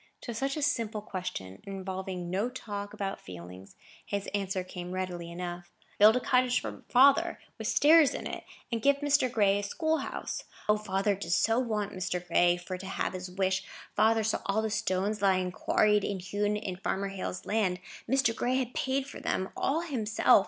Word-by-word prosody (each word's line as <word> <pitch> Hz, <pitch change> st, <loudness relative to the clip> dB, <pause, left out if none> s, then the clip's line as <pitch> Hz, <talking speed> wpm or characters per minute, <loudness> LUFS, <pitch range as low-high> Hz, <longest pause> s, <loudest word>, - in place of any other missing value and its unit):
To 235 Hz, -, -5 dB
such 270 Hz, +5 st, -1 dB
a 300 Hz, -, -1 dB
simple 230 Hz, -7 st, 0 dB
question, 180 Hz, -, -5 dB
involving 190 Hz, -2 st, -5 dB
no 200 Hz, +6 st, 0 dB
talk 205 Hz, -5 st, -6 dB
about 195 Hz, -1 st, -4 dB
feelings, 90 Hz, +2 st, -10 dB, 0.3 s
his 200 Hz, -1 st, -3 dB
answer 195 Hz, -2 st, -1 dB
came 180 Hz, -1 st, -7 dB
readily 180 Hz, -2 st, -3 dB
enough. 175 Hz, 0 st, -6 dB, 0.3 s
"Build 215 Hz, +2 st, +8 dB
a -, -, +2 dB
cottage 250 Hz, 0 st, +3 dB
for -, -, -7 dB
father, 270 Hz, +2 st, +5 dB, 0.2 s
with -, -, -3 dB
stairs 310 Hz, -1 st, +6 dB
in -, -, -5 dB
it, -, -, -5 dB, 0.3 s
and 230 Hz, -1 st, -1 dB
give 280 Hz, +3 st, +5 dB
Mr. 285 Hz, -3 st, +3 dB
Gray 200 Hz, -3 st, +3 dB
a -, -, -2 dB
school 315 Hz, +10 st, 0 dB
house. -, -, -4 dB, 0.2 s
O, 210 Hz, -, +5 dB
father 205 Hz, -1 st, 0 dB
does 180 Hz, -3 st, 0 dB
so 225 Hz, +2 st, +3 dB
want 215 Hz, -5 st, -1 dB
Mr. 180 Hz, -1 st, -3 dB
Gray 175 Hz, +1 st, +4 dB
for 180 Hz, +1 st, -6 dB
to 190 Hz, -, -7 dB
have 195 Hz, -, -2 dB
his 185 Hz, 0 st, -5 dB
wish! 190 Hz, +1 st, 0 dB, 0.3 s
Father 220 Hz, +1 st, +4 dB
saw 220 Hz, -, +1 dB
all 210 Hz, +2 st, +1 dB
the 220 Hz, -, -1 dB
stones 205 Hz, 0 st, 0 dB
lying 185 Hz, -2 st, +2 dB
quarried 210 Hz, +2 st, +3 dB
and 200 Hz, -2 st, -2 dB
hewn 205 Hz, +3 st, -1 dB
on 190 Hz, -4 st, -4 dB
Farmer 195 Hz, +1 st, -2 dB
Hale's 185 Hz, -2 st, -5 dB
land; 200 Hz, -4 st, +1 dB, 0.3 s
Mr. 265 Hz, -3 st, +3 dB
Gray 250 Hz, +1 st, 0 dB
had 255 Hz, -2 st, -1 dB
paid 265 Hz, +1 st, 0 dB
for 280 Hz, -, -9 dB
them 190 Hz, -, -1 dB
all 310 Hz, +4 st, +1 dB
himself. 230 Hz, -12 st, +3 dB
200 Hz, 190 wpm, -30 LUFS, 185-230 Hz, 0.3 s, Build